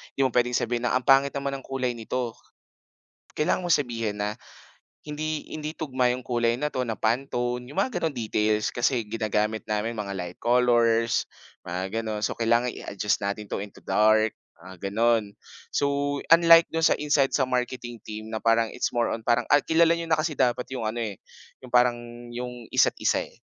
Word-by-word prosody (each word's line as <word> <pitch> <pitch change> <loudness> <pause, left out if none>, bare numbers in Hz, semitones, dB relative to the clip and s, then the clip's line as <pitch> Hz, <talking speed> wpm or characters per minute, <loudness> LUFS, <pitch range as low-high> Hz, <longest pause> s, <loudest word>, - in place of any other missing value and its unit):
di - - 0
mo - - +2
pwedeng 120 0 +3
sabihin 120 0 -1
na, - - +1
"Ang 125 - -16
pangit 135 +1 +5
naman 140 0 -3
ng - - -16
kulay 130 -2 -2
nito." 120 +1 -3 1.0
Kailangan 155 +4 +1
mong 175 - +4
sabihin 115 -3 -3
na, 105 +1 -1 0.7
"Hindi 155 +1 -4
hindi 155 +1 -5
tugma 130 -5 0
‘yong 125 +1 -4
kulay 120 -1 +1
na 150 +4 -2
‘to, 130 - -1
na 110 - -2
Pantone," 125 +1 -1
‘yong 140 - -11
mga 200 -2 0
gano’ng 160 -4 -2
details. 105 0 0
"Kasi 120 0 0
ginagamit 110 0 -1
namin 110 +1 -2
mga 100 -1 -4
light 90 -1 -6
colors," 120 -1 +2 0.4
mga 95 +5 -3
gano’n. 110 -1 -3
"So, - - -1
kailangan 120 +2 +2
i-adjust 100 -1 -2
natin 100 +1 -4
‘to - - -2
into 100 0 -9
dark," 110 +1 +3 0.3
mga 95 +1 -7
gano’n. 110 -1 +1 0.4
So, 140 0 0
unlike 165 0 +7
do’n 165 0 +3
sa - - +3
inside, 145 -2 +1
sa 135 - +2
marketing 125 -2 -3
team 110 +1 -8
na 110 - -2
parang 115 0 +2
it's - - -2
more 120 0 +1
on 115 - -4
parang 120 0 +3
ay 145 - +7
kilala 165 +1 +4
niyo 170 0 -5
na 160 - +3
kasi 155 -1 -1
dapat 125 0 +2
‘yong 125 -4 -3
ano, 115 +2 -2
eh, 105 -4 -6 0.5
‘yong 125 - -18
parang, 120 -1 +4 0.3
‘yong 125 -1 -7
isa’t - - +3
isa, - - +2
eh. - - -21
120 Hz, 190 wpm, -26 LUFS, 110-135 Hz, 1.0 s, unlike